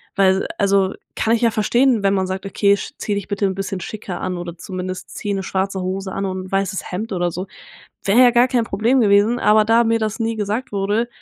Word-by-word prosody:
weil 190 -1 +3
also 195 -1 +2 0.2
kann 225 +1 +2
ich - - -3
ja 230 - +4
verstehen, 235 +2 +2
wenn 195 0 +2
man 190 -1 +1
sagt: 190 +1 -4
„Okay, 200 0 +3
sch 200 - -7
zieh 210 - -2
dich 200 -2 -3
bitte 200 0 -1
'n 190 - 0
bisschen 195 -1 -4
schicker 205 -1 -6
an 185 -1 -3
oder 175 -1 -7
zumindest 185 +1 -6
zieh 205 - -3
'ne 195 -1 -2
schwarze 190 0 -2
Hose 190 +1 -3
an 195 - -3
und 185 -1 -4
'n - - -16
weißes 195 0 -2
Hemd 210 +5 -4
oder 175 -1 0
so“. 180 +3 -5 0.6
Wäre 205 +6 +4
ja 245 -1 +7
gar 240 +1 +4
kein 250 -2 +1
Problem 230 +4 +1
gewesen, 210 +2 +3
aber 215 0 +4
da 230 +2 +4
mir 230 0 +2
das 220 +1 -3
nie 225 0 -1
gesagt 215 +5 -2
wurde, 205 +4 0
200 Hz, 235 wpm, -20 LUFS, 190-225 Hz, 0.6 s, ja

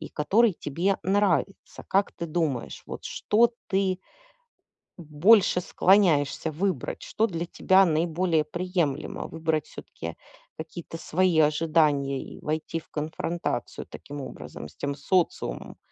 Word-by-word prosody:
и - - -7
который 210 +8 +3
тебе 170 +6 -1
нравится. 195 0 0
Как 195 +1 +2
ты 170 - -5
думаешь, 155 -7 -2
вот - - -8
что 235 +3 +2 0.2
ты 190 -1 +1 1.0
больше 180 +5 +4
склоняешься 165 -6 +3
выбрать, 190 +4 -2
что 220 - 0
для 170 -4 -4
тебя 190 +2 +4
наиболее 165 0 +1
приемлемо: 170 -3 -2
выбрать 160 -2 -1
всё-таки 80 0 -8 0.4
какие-то 165 +1 -8
свои 175 -1 +2
ожидания 150 -3 +2
и - - -10
войти 155 +2 -2
в - - -13
конфронтацию 160 +3 -3
таким 145 0 -9
образом 75 - -8
с - - -19
тем 140 0 -3
социумом, 170 +5 -1
165 Hz, 120 wpm, -26 LUFS, 150-185 Hz, 1.0 s, больше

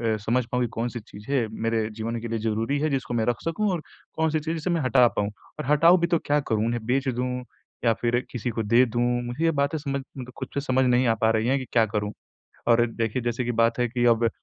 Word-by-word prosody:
अ, - - -4
समझ 125 +2 +1
पाऊँ 125 0 +1
कि - - 0
कौन-सी 120 +1 -3
चीज़ 105 -1 -13
है 130 -5 +2
मेरे 115 -1 0
जीवन 115 +2 -4
के 115 - -4
लिए 115 -1 -2
ज़रूरी 115 +6 -1
है 155 +1 +1
जिसको 135 -3 -2
मैं 115 -2 +1
रख 120 0 -1
सकूँ 185 +6 0
और 175 -3 -2 0.3
कौन-सी 160 -1 +1
चीज़ 160 +2 -3
जिसे 165 +2 -3
मैं 170 -2 +1
हटा 130 -2 +5
पाऊँ 100 0 +1 0.3
और - - -3
हटाऊँ 165 +5 +6
भी 170 - +1
तो 170 -1 +2
क्या 145 +1 +2
करूँ? 110 -6 0
उन्हें 120 -1 -2
बेच 135 +3 0
दूँ, 125 0 -2 0.4
या 115 - +5
फिर 120 0 +2
किसी 120 -1 -3
को 115 -1 -2
दे 115 +4 +5
दूँ, 120 0 -2 0.2
मुझे 120 +6 -4
ये 165 - +4
बातें 140 +1 0
समझ 140 -2 -3 0.2
मतलब 125 -1 -7
खुद - - -5
से 140 - -1
समझ 130 -2 +1
नहीं 125 0 +3
आ 115 - +4
पा 110 - +4
रही 110 +1 +1
हैं 135 +2 +3
कि 130 - -6
क्या 115 -2 +4
करूँ। 105 -1 -2 0.6
और 120 0 +5
देखिए 115 +1 -2
जैसे 120 +1 -1
कि 120 - -1
बात 115 +1 +3
है 125 - +2
कि 120 +1 -1
अब 115 0 +4
120 Hz, 260 wpm, -25 LUFS, 115-140 Hz, 0.6 s, हटाऊँ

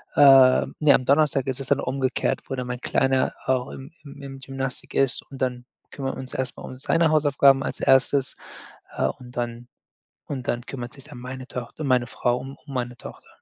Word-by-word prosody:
ähm 135 -2 +6
ne, 150 -3 +6
am 130 - +2
Donnerstag 140 -1 +3
ist 130 +1 -2
es 135 - -6
dann - - +2
umgekehrt, 130 0 -1
wo 135 - -3
dann 125 -1 -4
mein 125 0 -5
Kleiner 130 -1 +1
auch 130 0 0
im 135 +4 -10
im 140 -1 -12
im 135 -1 -8
Gymnastic 135 -1 -5
ist 135 -3 +1
und 135 - -10
dann 125 -1 -2 0.3
kümmern 135 -1 -4
wir - - -8
uns 130 0 -8
erst 130 -1 -3
mal - - -9
um 130 - -8
seine 165 +4 +2
Hausaufgaben 140 -3 +4
als - - -4
1.. 135 0 +3 0.6
Äh, - - +1
und 125 - -8
dann 120 0 -4 0.6
und 130 -4 -5
dann 120 +1 -2
kümmert 125 -3 -6
sich 135 0 -13
dann 145 -5 -11
meine 130 +1 -7
Tocht 125 +4 -7
meine 130 -5 +2
Frau 120 +1 0
um 135 +2 -8
um 140 - -9
meine 125 -1 -3
Tochter. - - -11
130 Hz, 205 wpm, -24 LUFS, 125-135 Hz, 0.6 s, ähm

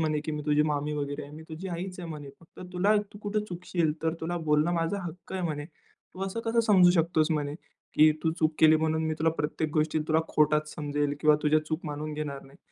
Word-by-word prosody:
म्हणे, 155 -2 +1
की 155 - -3
मी 150 0 -3
तुझी 150 0 +4
मामी 150 0 -1
वगैरे 145 0 -3
आहे. 140 - -10
मी 160 - -9
तुझी 160 +4 -6
आईच 180 +1 -5
आहे 170 - -6
म्हणे. 145 -3 -7
फक्त 165 - -16
तुला 195 +4 +3 0.2
तू 205 - -11
कुठे 210 +1 0
चुकशील 175 -3 -1
तर 160 0 +1
तुला 175 +2 -2
बोलणं 150 +3 +3
माझा 165 +4 0
हक्क 175 0 -8
आहे 190 -1 -2
म्हणे. 150 -3 -2 0.5
तू 185 - -6
असं 195 +4 -4
कसं 230 +1 +1
समजू 185 -4 +7
शकतोस 165 -2 +2
म्हणे, 145 -2 -1 0.4
की 155 +1 +7
तू 160 - +2
चूक 155 0 +2
केली 155 0 +7
म्हणून 160 0 0
मी 155 - 0
तुला 160 +1 +3
प्रत्येक 150 +1 -1
गोष्टी 155 0 +2
तुला 160 0 +4
खोटाच 150 0 +2
समजेल 145 -1 -1
किंवा 150 -1 +5
तुझ्या 155 +1 +4
चूक 155 +1 -2
मानून 150 +1 -4
घेणार 150 -2 -4
नाही." 135 +1 -18
155 Hz, 225 wpm, -28 LUFS, 150-175 Hz, 0.5 s, समजू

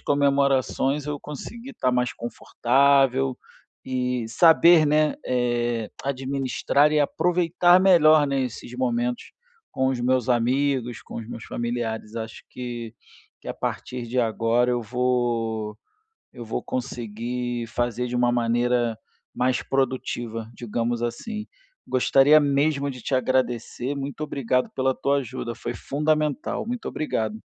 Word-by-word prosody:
comemorações 140 0 +1
eu 150 0 -3
conseguir 230 - -8
estar 130 - 0
mais 125 -1 0
confortável 135 +2 +2 0.5
e 125 -2 -1
saber, 165 +4 +6
né, 150 +1 +3
é, 120 -2 0 0.2
administrar 140 +2 +1
e 150 - +3
aproveitar 175 +3 +3
melhor, 155 -5 +6
né, 140 -1 0
esses 125 0 -6
momentos 120 -1 -1 0.4
com 130 - 0
os 130 -2 -1
meus 125 0 +1
amigos, 125 0 +1
com - - -12
os 115 - -6
meus 115 - -7
familiares. 120 -2 -4
Acho 110 -1 -6
que 120 -2 -6 0.5
que - - -9
a - - -3
partir 125 -1 -4
de 125 +2 -2
agora 115 +2 +1
eu 120 - -1
vou 115 -2 -1 0.6
eu 120 - -8
vou 110 - -3
conseguir 120 0 -4
fazer 120 +1 -2
de 125 - -4
uma 120 0 +3
maneira 120 -1 +1 0.4
mais 125 0 +1
produtiva, 120 -4 -2
digamos 120 +1 -2
assim. 215 - -4 0.4
Gostaria 135 +3 +5
mesmo 140 0 +1
de 125 -2 -10
te 135 - -4
agradecer, 130 +1 -1
muito 140 +1 -5
obrigado 130 -3 0
pela 130 0 +1
tua 140 +1 +1
ajuda, 125 -2 -4
foi - - -5
fundamental. 150 +4 -1
Muito 245 0 -4
obrigado 110 -8 -3
125 Hz, 130 wpm, -24 LUFS, 120-140 Hz, 0.6 s, saber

